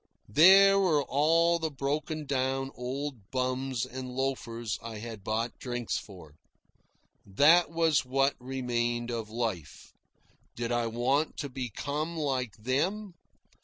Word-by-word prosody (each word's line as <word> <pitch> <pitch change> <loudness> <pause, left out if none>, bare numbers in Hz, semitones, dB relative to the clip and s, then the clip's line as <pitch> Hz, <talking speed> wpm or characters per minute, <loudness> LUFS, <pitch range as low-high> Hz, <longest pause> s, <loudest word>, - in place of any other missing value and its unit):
There 195 - +7
were 160 -7 +3
all 165 +5 +3
the 160 -1 -1
broken 150 +2 -3
down 135 0 -1
old 125 -3 -5
bums 130 -1 -1
and 130 0 -7
loafers 125 -4 -3
I 115 -1 -7
had 110 -2 -8
bought 115 +3 -2
drinks 120 -2 -3
for. 90 -7 -13 0.9
That 150 - +5
was 165 -2 +2
what 135 +2 +1
remained 120 -2 -2
of 115 -2 -4
life. 110 -9 -4 0.6
Did 120 0 -3
I 120 -1 +1
want 130 +7 0
to 140 - -4
become 140 +6 -4
like 130 -7 -1
them? 170 - -1
130 Hz, 125 wpm, -29 LUFS, 120-150 Hz, 0.9 s, There